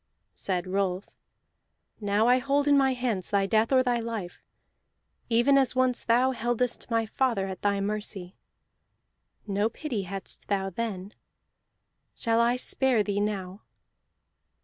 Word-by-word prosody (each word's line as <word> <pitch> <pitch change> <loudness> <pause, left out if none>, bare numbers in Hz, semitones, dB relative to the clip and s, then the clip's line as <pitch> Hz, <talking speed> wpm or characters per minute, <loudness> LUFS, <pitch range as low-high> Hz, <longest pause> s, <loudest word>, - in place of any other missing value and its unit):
Said 180 -2 -2
Rolf: 190 0 -2 0.9
"Now 205 +1 +1
I 250 +1 +5
hold 280 +2 +1
in 290 - +5
my 270 -1 +3
hands 240 -7 -2
thy 200 -1 +2
death 220 +4 +2
or 260 -1 +5
thy 245 -1 +1
life, 225 -6 -5 0.9
even 240 +4 +4
as 265 -1 +1
once 255 -1 +2
thou 245 +3 +3
heldest 240 0 -1
my 230 -1 +1
father 230 -3 0
at 190 -1 -6
thy 200 -1 +1
mercy. 200 -3 -3 1.1
No 205 +1 0
pity 250 -6 -4
hadst 195 +1 -6
thou 195 -1 -1
then. 200 -1 -4 1.0
Shall 230 -1 +1
I 235 +1 +3
spare 250 -2 +1
thee 205 -1 -1
now?" 200 -1 -3
220 Hz, 135 wpm, -27 LUFS, 195-250 Hz, 1.1 s, I